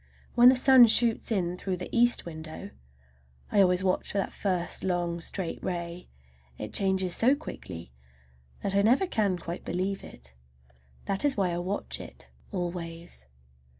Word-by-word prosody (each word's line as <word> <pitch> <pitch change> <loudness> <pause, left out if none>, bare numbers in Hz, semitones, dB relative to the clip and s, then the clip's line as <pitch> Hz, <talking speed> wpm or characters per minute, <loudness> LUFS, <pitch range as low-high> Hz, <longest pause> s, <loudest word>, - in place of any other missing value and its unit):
When 245 +1 +8
the 260 - +5
sun 255 -1 +7
shoots 230 +1 +3
in 180 -4 0
through 185 -2 -3
the 180 - -6
east 240 +1 +4
window—I 65 - -6
always 180 -1 +3
watch 185 -1 0
for - - -3
that 195 - -1
first 180 -3 -1
long, 175 -2 -1
straight 175 +1 -4
ray—it 85 - -8
changes 190 -2 +1
so 255 +5 +4
quickly 85 - -9 0.7
that 195 - -1
I 200 - +3
never 245 - +3
can 205 - 0
quite 170 0 -7
believe 190 +2 -3
it. 65 +1 -12 0.7
That 195 0 -1
is 290 -4 +1
why 190 -3 +1
I 170 - -2
watch 190 +3 -4
it - - -12 0.2
always. 170 - -5
180 Hz, 150 wpm, -28 LUFS, 165-200 Hz, 0.7 s, When